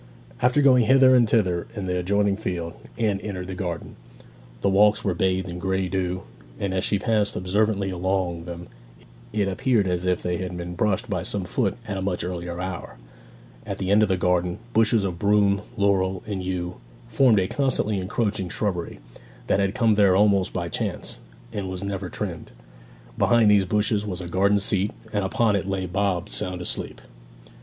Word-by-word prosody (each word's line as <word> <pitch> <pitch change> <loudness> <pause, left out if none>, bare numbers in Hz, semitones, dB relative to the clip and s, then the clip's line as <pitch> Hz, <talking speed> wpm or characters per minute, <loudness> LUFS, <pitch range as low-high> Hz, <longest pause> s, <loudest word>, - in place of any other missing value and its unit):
After 125 +4 +3
going 125 -4 +6
hither 130 +1 +6
and 120 -3 +4
thither 90 -7 +1
in 100 -3 -4
the 90 -1 -1
adjoining 100 +2 +1
field, 90 -5 -4 0.2
Anne 105 -4 +1
entered 95 -3 -5
the 95 - -5
garden. 90 -3 -5 0.6
The - - +2
walks 105 +2 +4
were 95 - +2
bathed 95 +1 0
in 90 0 -6
grey 95 0 -1
dew, 90 0 -2 0.4
and 100 -2 -2
as 95 - 0
she 100 - +2
passed 105 +1 +1
observantly 100 +1 0
along 90 -2 -1
them 85 0 -7 0.7
it 105 -2 0
appeared 105 +2 +1
as 90 -1 -1
if 90 -1 0
they 90 -1 -1
had 90 0 -5
been 90 0 -5
brushed 105 +5 0
by 95 -5 -2
some 100 +2 -2
foot 100 +1 0
at 100 -2 -3
a - - -3
much 95 -2 -2
earlier 90 -1 -4
hour. 90 -8 -5 0.7
At - - -5
the 95 0 -2
end 105 +1 +5
of 105 - +3
the 95 - +2
garden, 90 0 +1 0.2
bushes 110 -1 +4
of 90 -3 -3
broom, 100 -1 +3 0.2
laurel, 95 -2 +1
and 100 -3 -3
yew 90 -1 -3 0.3
formed 115 -2 +4
a 95 - 0
constantly 115 -7 0
encroaching 100 0 -1
shrubbery, 90 -3 -2 0.5
that - - +1
had 100 0 0
come 115 -3 +3
there 100 -3 +4
almost 100 -2 +3
by 85 -2 -3
chance, 85 - -3 0.3
and 100 -3 -3
was 95 0 -4
never 100 -2 -4
trimmed. - - -5 0.7
Behind 115 -3 +5
these 100 -2 +4
bushes 105 +2 +1
was 95 -4 -4
a 90 - -6
garden 100 +3 +2
seat, 100 0 +1 0.2
and 105 -1 0
upon 105 +2 +2
it 100 -1 -2
lay 95 -1 -1
Bob 95 0 -1
sound 90 -1 -3
asleep. 90 - -3
95 Hz, 185 wpm, -24 LUFS, 90-105 Hz, 0.7 s, going